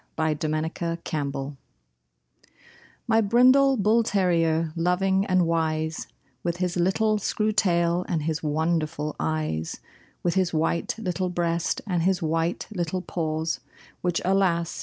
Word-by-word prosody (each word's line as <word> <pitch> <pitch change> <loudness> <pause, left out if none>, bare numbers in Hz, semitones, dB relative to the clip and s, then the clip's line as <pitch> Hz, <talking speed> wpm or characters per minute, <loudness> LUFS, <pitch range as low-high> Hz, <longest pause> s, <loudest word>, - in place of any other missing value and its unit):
MY 160 -1 +1
BRINDLE 155 +1 -1
BULL 170 -1 -2
TERRIER 140 -2 -3 1.5
My 225 -1 +3
brindle 255 +5 +5
bull 215 +3 +3
terrier, 165 -6 +1
loving 190 +3 +1
and 185 -2 +3
wise, 160 -1 -1 0.3
With 170 0 -2
his 180 -1 -1
little 210 +5 +2
screw 215 +2 0
tail 175 -4 +2
and 160 -4 0
his 160 0 -2
wonderful 155 -1 -1
eyes, 155 - -2 0.4
With 175 - +1
his 185 -3 +1
white 165 +2 0
little 185 -3 -2
breast 170 -1 -1
and 180 -5 0
his 185 +1 +2
white 165 +2 -1
little 180 -2 -2
paws 160 -2 -2 0.4
Which, 175 -2 0
alas! 180 -3 +1
170 Hz, 130 wpm, -25 LUFS, 160-190 Hz, 1.5 s, brindle